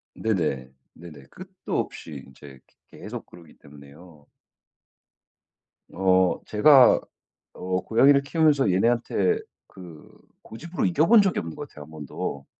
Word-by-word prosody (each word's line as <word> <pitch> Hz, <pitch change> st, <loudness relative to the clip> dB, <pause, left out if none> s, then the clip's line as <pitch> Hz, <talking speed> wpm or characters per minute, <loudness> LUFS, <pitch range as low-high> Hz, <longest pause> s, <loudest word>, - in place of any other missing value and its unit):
네네. 75 Hz, -11 st, -2 dB, 0.2 s
네네. 80 Hz, -5 st, -14 dB
끝도 185 Hz, 0 st, -6 dB
없이 70 Hz, -4 st, -7 dB
인제 65 Hz, 0 st, -15 dB
그 -, -, -36 dB, 0.2 s
계속 -, -, -8 dB
그러기 85 Hz, -3 st, -17 dB
때문에요 75 Hz, +2 st, -17 dB, 1.6 s
어 95 Hz, 0 st, +1 dB
제가 130 Hz, +4 st, +5 dB, 0.5 s
어 90 Hz, 0 st, -3 dB
고양이를 140 Hz, +5 st, +3 dB
키우면서 145 Hz, -, +1 dB
얘네한테 120 Hz, -, 0 dB, 0.3 s
그 85 Hz, -5 st, -14 dB, 0.3 s
고집으로 165 Hz, +11 st, -5 dB
이겨 165 Hz, -3 st, +2 dB
본 230 Hz, -1 st, +6 dB
적이 195 Hz, -2 st, 0 dB
없는 80 Hz, -1 st, -7 dB
것 -, -, -8 dB
같아요, 75 Hz, -1 st, -12 dB
1 80 Hz, -, -18 dB
번도. 70 Hz, -2 st, -7 dB
95 Hz, 255 characters per minute, -24 LUFS, -, 1.6 s, 본